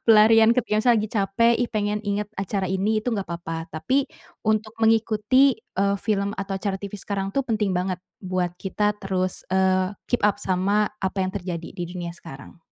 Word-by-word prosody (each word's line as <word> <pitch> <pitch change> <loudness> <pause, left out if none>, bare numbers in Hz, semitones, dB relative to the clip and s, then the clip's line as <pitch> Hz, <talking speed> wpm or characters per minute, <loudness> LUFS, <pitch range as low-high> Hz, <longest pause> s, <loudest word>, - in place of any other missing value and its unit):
Pelarian 225 0 +7
ke 250 - +3
biasa 215 +3 +2
lagi 215 -1 0
capek, 220 +3 +2
"Ih, 245 - 0
pengin 210 -1 0
ingat 205 0 -1
acara 195 0 -2
ini." 200 +4 +1
Itu 220 - -4
gak 200 - -2
papa. 165 -1 -5
Tapi 255 - +1 0.4
untuk 215 0 0
mengikuti, 225 +4 +4
eee, 200 -2 -1
film 200 -1 0
atau 195 0 -4
acara 195 0 -2
TV 200 0 -7
sekarang, 195 -1 -3
tuh, 275 - +3
penting 215 -5 0
banget 180 +1 -1 0.2
buat 185 -2 -1
kita 210 +2 0
terus, 185 -1 -2
eee, 185 +1 +2
keep 245 - 0
up 205 - +2
sama 200 +3 +1
apa 190 0 -2
yang 185 - -3
terjadi 180 -4 -4
di 175 - -5
dunia 175 -1 -5
sekarang. 150 -2 -12
200 Hz, 180 wpm, -24 LUFS, 185-215 Hz, 0.4 s, Pelarian